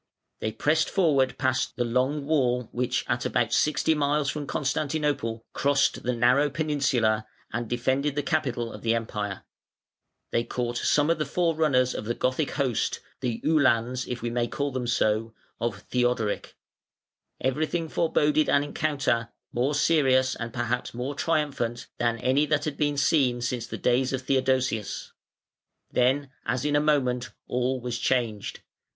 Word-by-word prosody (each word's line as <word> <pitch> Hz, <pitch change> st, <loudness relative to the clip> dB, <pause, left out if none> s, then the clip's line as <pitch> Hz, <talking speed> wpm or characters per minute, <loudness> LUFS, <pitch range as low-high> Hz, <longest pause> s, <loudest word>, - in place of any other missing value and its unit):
They 110 Hz, -, -2 dB
pressed 150 Hz, +8 st, +1 dB
forward 140 Hz, -9 st, +2 dB
past 130 Hz, 0 st, 0 dB
the 120 Hz, -, 0 dB
long 130 Hz, +5 st, 0 dB
wall 125 Hz, -6 st, +1 dB
which 125 Hz, 0 st, -1 dB
at 120 Hz, 0 st, 0 dB
about 115 Hz, 0 st, 0 dB
sixty 150 Hz, +1 st, +3 dB
miles 145 Hz, -1 st, +1 dB
from 145 Hz, -2 st, -5 dB
Constantinople 140 Hz, -5 st, -1 dB
crossed 140 Hz, 0 st, +2 dB
the 125 Hz, 0 st, -1 dB
narrow 125 Hz, +5 st, +4 dB
peninsula 135 Hz, -8 st, +1 dB, 0.3 s
and 120 Hz, -1 st, -3 dB
defended 130 Hz, +4 st, 0 dB
the 145 Hz, -, 0 dB
capital 125 Hz, -7 st, -1 dB
of -, -, -9 dB
the 115 Hz, 0 st, +2 dB
Empire; 105 Hz, -3 st, -3 dB, 0.9 s
they 115 Hz, -, +1 dB
caught 120 Hz, 0 st, -3 dB
some 150 Hz, +2 st, +3 dB
of 165 Hz, -, 0 dB
the 155 Hz, -, 0 dB
forerunners 155 Hz, -6 st, +2 dB
of 105 Hz, -, -5 dB
the 120 Hz, +2 st, -1 dB
Gothic 130 Hz, +3 st, 0 dB
host, 130 Hz, -6 st, 0 dB, 0.2 s
the 120 Hz, -3 st, -2 dB
Uhlans, 130 Hz, -5 st, +2 dB
if 125 Hz, -1 st, -5 dB
we 120 Hz, -, -1 dB
may 120 Hz, 0 st, 0 dB
call 140 Hz, +3 st, -2 dB
them 125 Hz, -2 st, -3 dB
so, 110 Hz, -1 st, +1 dB, 0.2 s
of 110 Hz, -4 st, -2 dB
Theodoric: 120 Hz, -4 st, 0 dB, 0.8 s
everything 155 Hz, +5 st, -1 dB
foreboded 155 Hz, -2 st, +2 dB
an 140 Hz, -, +4 dB
encounter, 145 Hz, -6 st, 0 dB, 0.2 s
more 130 Hz, +5 st, +1 dB
serious 130 Hz, -4 st, +3 dB
and 115 Hz, -1 st, -5 dB
perhaps 120 Hz, -1 st, -2 dB
more 125 Hz, +4 st, -3 dB
triumphant 140 Hz, -7 st, -1 dB
than 120 Hz, -1 st, +1 dB
any 130 Hz, +6 st, +2 dB
that 150 Hz, -1 st, +1 dB
had 150 Hz, -2 st, -2 dB
been 145 Hz, -1 st, 0 dB
seen 135 Hz, -4 st, +3 dB
since 120 Hz, -1 st, -2 dB
the -, -, -5 dB
days 125 Hz, +2 st, +1 dB
of 130 Hz, 0 st, -2 dB
Theodosius. 130 Hz, -5 st, 0 dB, 0.8 s
Then, 130 Hz, +2 st, +2 dB
as 125 Hz, +4 st, -1 dB
in 145 Hz, 0 st, +1 dB
a -, -, +5 dB
moment, 130 Hz, -5 st, +1 dB, 0.2 s
all 125 Hz, +1 st, 0 dB
was 120 Hz, 0 st, -4 dB
changed. 115 Hz, -6 st, -1 dB
130 Hz, 155 wpm, -26 LUFS, 120-145 Hz, 0.9 s, a